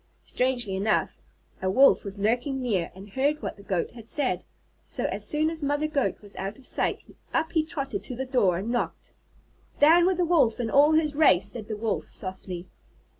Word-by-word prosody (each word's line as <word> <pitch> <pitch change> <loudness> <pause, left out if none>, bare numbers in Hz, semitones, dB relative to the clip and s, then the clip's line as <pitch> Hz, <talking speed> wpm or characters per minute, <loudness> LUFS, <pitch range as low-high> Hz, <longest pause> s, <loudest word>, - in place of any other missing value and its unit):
'" - - -39
Strangely 245 -6 -1
enough, 205 +3 0 0.4
a 190 - 0
Wolf 265 +9 +5
was 200 -1 -6
lurking 245 +6 0
near 210 -9 -1
and 195 +2 -12
heard 285 +6 +1
what - - -4
the 200 - -14
Goat 190 -3 -2
had 230 -2 -8
said. 220 - 0 0.4
So, - - -3
as - - -2
soon 310 +1 +1
as 325 -1 -7
Mother 290 +1 0
Goat 290 -7 -1
was 205 -1 -11
out 195 +2 -4
of 270 - -17
sight, - - -1 0.3
up 320 - +1
he 320 - +2
trotted 275 - -4
to 250 - -5
the 265 +2 -3
door 235 -10 +2
and 205 +6 -3
knocked. 240 - -3 0.6
"Down 335 +4 +6
with 375 -2 +1
the 355 - +2
Wolf 305 -10 +3
and 225 -2 -2
all 290 +3 +6
his 310 -1 +2
race," 270 - +4
said 220 -2 -7
the 215 - -4
Wolf 220 0 -2
softly. 185 -2 -6
245 Hz, 205 wpm, -26 LUFS, 200-295 Hz, 0.6 s, Down